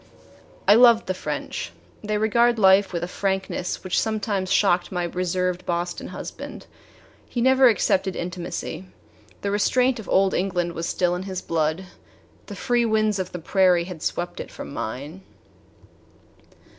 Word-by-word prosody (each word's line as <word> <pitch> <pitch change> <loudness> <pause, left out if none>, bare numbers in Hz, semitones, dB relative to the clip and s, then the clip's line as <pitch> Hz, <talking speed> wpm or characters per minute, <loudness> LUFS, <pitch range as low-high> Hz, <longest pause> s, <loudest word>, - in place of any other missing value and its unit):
I - - +8
loved 235 0 +6
the 185 - -1
French. - - -5 0.3
They 210 0 -1
regard 235 +3 +3
life 195 -1 +5
with 170 -2 -3
a - - -2
frankness 190 -1 -2
which 185 - +1
sometimes 205 -3 -2
shocked 185 -3 +2
my 180 -2 -1
reserved 180 +1 -1
Boston 175 0 -3
husband. - - -8 0.6
He 245 - -3
never 260 +2 +5
accepted 190 -3 +1
intimacy. 175 +1 -5 0.6
The 200 - -2
restraint 250 +5 +2
of 220 - -9
old 195 0 +3
England 175 -2 -1
was 165 0 -3
still 175 -1 +1
in 180 - -3
his 185 -1 -4
blood. 160 +2 -1 0.6
The - - -7
free 240 -1 +1
winds 215 -2 +1
of 185 -1 -3
the - - -5
prairie 180 0 +3
had 175 -3 -8
swept 175 +1 -3
it - - -6
from - - -9
mine. 140 +10 -5
190 Hz, 150 wpm, -24 LUFS, 175-210 Hz, 0.6 s, I